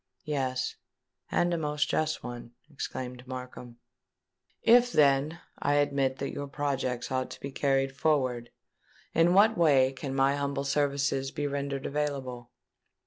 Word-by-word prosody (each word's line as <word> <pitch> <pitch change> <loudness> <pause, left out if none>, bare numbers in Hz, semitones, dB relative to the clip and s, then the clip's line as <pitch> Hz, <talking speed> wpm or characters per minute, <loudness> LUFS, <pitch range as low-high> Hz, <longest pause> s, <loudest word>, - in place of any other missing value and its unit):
"Yes—and 140 +4 -3
a 170 - 0
most 150 -1 0
just 155 0 -1
one," 120 -1 -8 0.2
exclaimed 125 -3 -6
Markham. 125 -2 -8 0.9
"If 245 +1 +6
then, 145 - +3 0.2
I 145 - +1
admit 140 -2 +1
that 140 - -3
your 145 - -5
projects 135 -4 -2
ought 130 0 -1
to - - -9
be 140 - -6
carried 135 -1 +1
forward, 130 -6 0 0.6
in 170 +2 +4
what 215 +2 +5
way 135 -5 +5
can 135 0 -5
my 135 +1 +3
humble 140 -1 -2
services 140 -1 0
be 145 +1 -3
rendered 140 -1 -3
available?" 135 -5 -3
140 Hz, 135 wpm, -29 LUFS, 130-145 Hz, 0.9 s, If